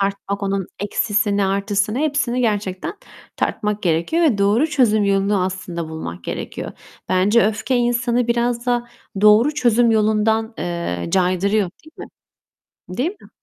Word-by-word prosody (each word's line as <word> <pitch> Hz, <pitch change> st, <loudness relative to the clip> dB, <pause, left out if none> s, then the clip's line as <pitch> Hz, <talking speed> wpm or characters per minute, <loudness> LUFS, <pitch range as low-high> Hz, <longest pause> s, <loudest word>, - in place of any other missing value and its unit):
tartmak 200 Hz, 0 st, -2 dB
onun 195 Hz, -1 st, -1 dB
eksisini, 205 Hz, 0 st, 0 dB
artısını, 200 Hz, +3 st, 0 dB
hepsini 285 Hz, -5 st, 0 dB
gerçekten 205 Hz, -, -2 dB, 0.4 s
tartmak 210 Hz, 0 st, -2 dB
gerekiyor 170 Hz, -, +1 dB
ve 235 Hz, -10 st, +2 dB
doğru 210 Hz, +9 st, +3 dB
çözüm 235 Hz, -9 st, +2 dB
yolunu 195 Hz, 0 st, +1 dB
aslında 180 Hz, -3 st, -4 dB
bulmak 90 Hz, -, -7 dB
gerekiyor. -, -, -5 dB, 0.4 s
Bence 200 Hz, +4 st, +3 dB
öfke, 220 Hz, +4 st, -1 dB
insanı 240 Hz, 0 st, +1 dB
biraz 235 Hz, 0 st, 0 dB
da 240 Hz, -1 st, 0 dB, 0.3 s
doğru 215 Hz, +8 st, +5 dB
çözüm 240 Hz, -4 st, +3 dB
yolundan, 220 Hz, +1 st, +1 dB
eee, 170 Hz, -, -3 dB
caydırıyor, 190 Hz, +1 st, +1 dB
değil 315 Hz, -, -16 dB
mi? -, -, -7 dB, 0.9 s
Değil 285 Hz, +8 st, +1 dB
mi? -, -, -16 dB
210 Hz, 130 wpm, -20 LUFS, 195-240 Hz, 0.9 s, doğru